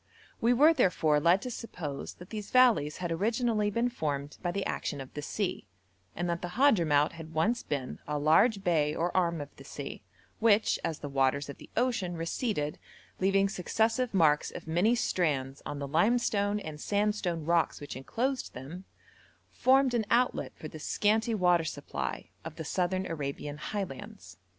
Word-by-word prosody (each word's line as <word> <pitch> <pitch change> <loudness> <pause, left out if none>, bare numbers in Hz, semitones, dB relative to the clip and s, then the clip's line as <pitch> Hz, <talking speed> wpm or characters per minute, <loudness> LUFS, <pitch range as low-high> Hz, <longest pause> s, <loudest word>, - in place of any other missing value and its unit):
We 235 - +4
were, 295 +7 +6
therefore, 160 - +3
led 170 +5 +3
to 250 - -4
suppose 160 -12 -6
that 180 - -13
these 210 -2 -5
valleys 245 - +4
had 175 -2 -3
originally 215 +3 +1
been 235 +4 0
formed 145 - -3
by 175 - -1
the 195 +2 -2
action 145 - -3
of 135 -1 -9
the 150 - -5
sea, 185 - -3 0.5
and 175 +1 -2
that 170 0 -2
the 175 -1 -5
Hadhramout 165 - +4
had 160 -1 -10
once 225 +9 +2
been 135 -4 -4
a 150 0 -1
large 190 +8 +4
bay 155 -4 +2
or 175 +2 -1
arm 170 -3 +2
of 145 - -9
the - - -12
sea, - - -7 0.4
which, 220 -1 +3
as 160 - -2
the 145 - -6
waters 140 +1 +1
of 140 - -8
the - - -13
ocean 220 -8 0
receded, 165 - -2 0.4
leaving 195 +1 +3
successive 225 +6 0
marks 155 -6 +3
of - - -9
many 175 +9 +2
strands 140 - -1
on 145 - -4
the 140 0 -4
limestone 205 - +2
and 155 -5 -7
sandstone 205 -6 0
rocks 170 0 +2
which 145 -3 -7
enclosed 250 - -2
them, 155 +9 -8 0.7
formed 265 0 +3
an 225 -3 0
outlet 235 - +2
for 155 - -8
the 155 - -10
scanty 220 +7 +1
water 180 -4 +3
supply 160 - -5
of 160 -1 -7
the 160 - -6
Southern 185 +3 0
Arabian 145 -2 -4
highlands. 205 +3 -6
175 Hz, 170 wpm, -30 LUFS, 150-220 Hz, 0.7 s, were